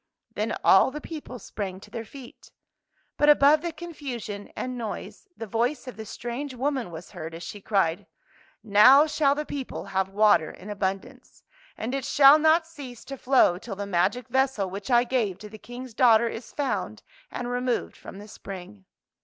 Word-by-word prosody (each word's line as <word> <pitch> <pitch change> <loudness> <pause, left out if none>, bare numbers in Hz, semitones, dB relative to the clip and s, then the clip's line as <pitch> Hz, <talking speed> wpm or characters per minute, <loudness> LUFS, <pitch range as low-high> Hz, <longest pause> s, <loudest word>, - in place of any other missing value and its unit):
" - - -43
Then - - -1
all - - +6
the 295 +3 -6
people 300 -5 -8
sprang 195 -5 -6
to - - -15
their 230 - -5
feet. 260 +1 -13 0.7
But 295 - +4
above 295 +1 +6
the 340 0 -3
confusion 270 -11 -7
and 255 0 -4
noise 235 - -7
the 225 - -5
voice 240 +7 -1
of 255 - -7
the 220 -1 -8
strange 255 +5 -5
woman 260 -3 -2
was 165 0 -10
heard, 165 -3 -7
as 170 - -8
she 205 - -8
cried, 185 -5 0 0.6
''Now 225 +8 +7
shall 295 -2 +2
the 300 +1 -3
people 275 -3 -6
have 190 0 0
w^ater 205 -5 +3
in 205 +3 -9
abundance. 195 -1 -5 0.3
And 230 +4 -4
it 275 -1 -2
shall 280 +2 +7
not 320 +2 +4
cease 280 -7 -11
to 275 - -6
flow 255 -9 +3
till 205 -1 -7
the 200 +1 -5
magic 200 +6 0
vessel 265 -7 +1
which 195 +4 -7
I 240 -1 +5
gave 235 -7 -1
to 210 +1 -10
the 215 +1 -12
King's 245 +1 -9
daughter 235 -1 +5
is 225 0 -7
found 280 -3 -3 0.3
and 245 - -5
removed 250 0 -1
from - - -11
the 205 +1 -10
spring." 195 -1 -10
240 Hz, 185 wpm, -26 LUFS, 200-275 Hz, 0.7 s, Now